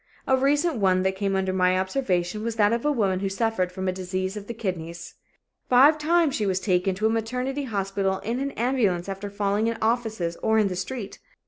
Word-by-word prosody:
A 265 - +3
recent 290 +3 +1
one 185 -3 +2
that 190 0 0
came 195 0 -1
under 190 -1 0
my 185 0 +3
observation 190 -2 -1
was 230 -1 -2
that 210 0 +3
of 235 - -1
a 295 - +2
woman 200 -8 +1
who 195 0 -1
suffered 195 -3 -1
from 190 +1 -4
a - - +2
disease 185 +1 -3
of 205 -1 -7
the 235 - -4
kidneys. 170 -5 -5 0.6
Five 280 +5 +6
times 325 -1 +2
she 210 -5 -1
was 190 -1 +1
taken 185 -1 +1
to 210 +4 -2
a - - +4
maternity 250 +5 -2
hospital 195 -3 -1
in 235 +4 -2
an 275 +1 -1
ambulance 220 -8 0
after 195 +1 -5
falling 205 +2 0
in 230 0 -1
offices 220 -7 -1
or 220 0 +2
in 210 -2 +3
the 180 - -4
street. 195 +3 -5
205 Hz, 215 wpm, -25 LUFS, 190-235 Hz, 0.6 s, Five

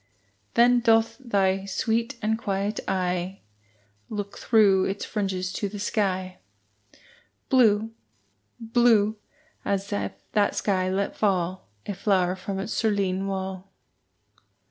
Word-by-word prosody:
Then 245 +1 +5
doth 225 0 +3
thy 195 -6 +1
sweet 230 +5 -1
and 220 +1 +2
quiet 205 -1 -2
eye 180 0 -1 0.7
Look 205 -1 -5
through 200 -5 +4
its 195 +1 -3
fringes 185 -3 -2
to 205 - -2
the 205 - -7
sky, 185 -3 -1 1.1
Blue 225 -4 +4 0.7
blue 225 -2 +3 0.5
as 200 +1 -2
if 205 - -2 0.2
that 205 -1 +2
sky 185 -2 0
let 195 +1 -1
fall 185 - 0 0.2
A - - -3
flower 185 -2 +1
from 190 +1 -5
its 195 +3 -3
cerulean 195 -3 0
wall. 190 0 -4
200 Hz, 115 wpm, -25 LUFS, 190-220 Hz, 1.1 s, Then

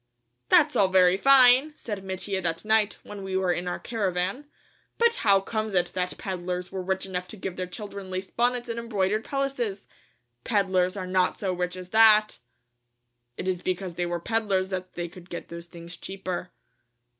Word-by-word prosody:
"That's - - +5
all 195 - +4
very 185 -1 +5
fine," 265 +5 +6
said 205 -8 -6
Mattia 190 0 -3
that 165 +1 -3
night, 215 -1 +2
when 205 -1 -9
we 190 -1 -2
were 185 -2 +2
in 175 +1 -4
our 175 - -2
caravan, 195 +3 -2 0.5
"but 465 0 +3
how 200 -2 +4
comes 215 +1 -3
it 175 -1 +2
that 180 -1 -2
peddlers 180 -2 -4
were 190 -1 -3
rich 190 +1 -2
enough 180 -1 -4
to 215 - -9
give 185 -1 -5
their 185 -1 -4
children 200 0 -8
lace 185 +1 -5
bonnets 245 0 0
and 230 0 -3
embroidered 215 -2 0
pelisses? 255 -8 -2 0.6
Peddlers 190 -3 +1
are 185 - -3
not 185 0 +1
so 190 -2 -1
rich 180 0 -2
as 185 -1 -9
that!" 215 0 +5 1.0
"It - - -4
is 180 -2 -1
because 185 0 -3
they 175 +1 -2
were 175 0 -2
peddlers 200 -2 0
that 185 -1 -5
they 175 0 -3
could 175 +1 -14
get 175 - -7
those 170 0 -8
things 170 0 -9
cheaper." 185 0 -5
190 Hz, 180 wpm, -26 LUFS, 180-215 Hz, 1.0 s, fine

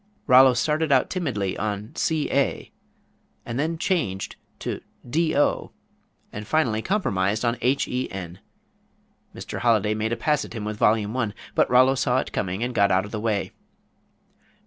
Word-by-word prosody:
Rollo 130 0 +7
started 150 +5 0
out 130 -2 +3
timidly 125 - -2
on 105 +2 -4
c 160 -2 0
a 140 0 0 0.7
then 150 +8 -2
changed 155 - -1 0.2
to - - -4 0.3
d 160 +5 +1
o, 145 - +1 0.6
and 105 0 -7
finally 120 -9 +1
compromised 110 - 0
on 120 0 +1
h 130 +4 +1
e 125 +1 -2
n. 90 -2 -7 1.0
Mr. - - -6
Holiday 110 -3 +2
made 110 +1 -2
a 120 - -1
pass 150 +5 +1
at - - -9
him 110 -3 -5
with 105 0 -4
Volume 110 +1 +2
I, 115 -5 -1 0.2
but - - +2
Rollo 130 +2 +5
saw 125 -1 +1
it - - -2
coming 95 +3 -2
and 125 +1 -2
got 100 -3 +3
out 95 +1 +2
of 105 - -10
the 110 - -3
way. 105 -3 -1
115 Hz, 165 wpm, -24 LUFS, 105-135 Hz, 1.0 s, Rollo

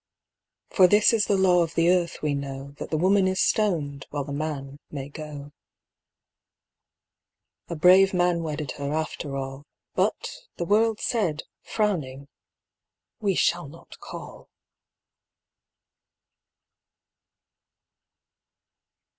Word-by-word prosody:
For 185 -2 +6
this 210 +5 +5
is 215 -3 +2
the 200 - +2
law 180 -2 +4
of 165 -1 -2
the 170 +1 +4
earth, 175 -3 0
we 150 -1 +1
know: 140 0 -5
That - - -6
the 155 - 0
woman 190 +3 +3
is 185 0 -1
stoned, 150 -10 0
while 145 -1 -3
the 140 0 -6
man 145 -2 -4
may 140 -2 -6
go. 145 -1 -8 2.2
A 170 - -4
brave 185 +4 +6
man 175 -2 +1
wedded 155 -3 -4
her 140 0 -3
after 155 -2 -3
all, 135 +1 -6 0.3
But - - -1 0.2
the 170 - -2
world 220 +3 +2
said, 195 -11 -1 0.2
frowning, 145 -11 -2 0.9
"We 200 -3 0
shall 170 -2 +1
not 165 +4 -14
call." - - -10
165 Hz, 115 wpm, -25 LUFS, 140-190 Hz, 2.2 s, For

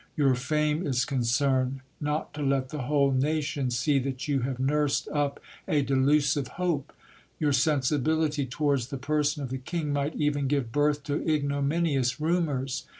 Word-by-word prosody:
Your 140 -3 +4
fame 150 +5 0
is 125 -2 +1
concerned, 130 +1 +1 0.2
not 150 +1 -2
to 150 - -6
let 135 -2 0
the 150 -1 -4
whole 140 -2 +3
nation 145 0 0
see 130 +4 +1
that 130 0 -4
you 140 -2 +1
have 130 0 -2
nursed 145 +1 +1
up 145 -1 -1 0.3
a 145 -2 +2
delusive 140 +1 +2
hope. 170 -6 -1 0.5
Your 150 -2 +2
sensibility 150 +1 +1
towards 140 -2 0
the 135 - -5
person 150 +2 0
of 130 - -4
the 130 - -3
king 150 +2 -3
might 145 +2 -1
even 145 -2 0
give 135 -4 0
birth 145 +1 +1
to 145 -1 -2
ignominious 140 -2 0
rumours. 150 -6 -1
140 Hz, 155 wpm, -27 LUFS, 130-150 Hz, 0.5 s, Your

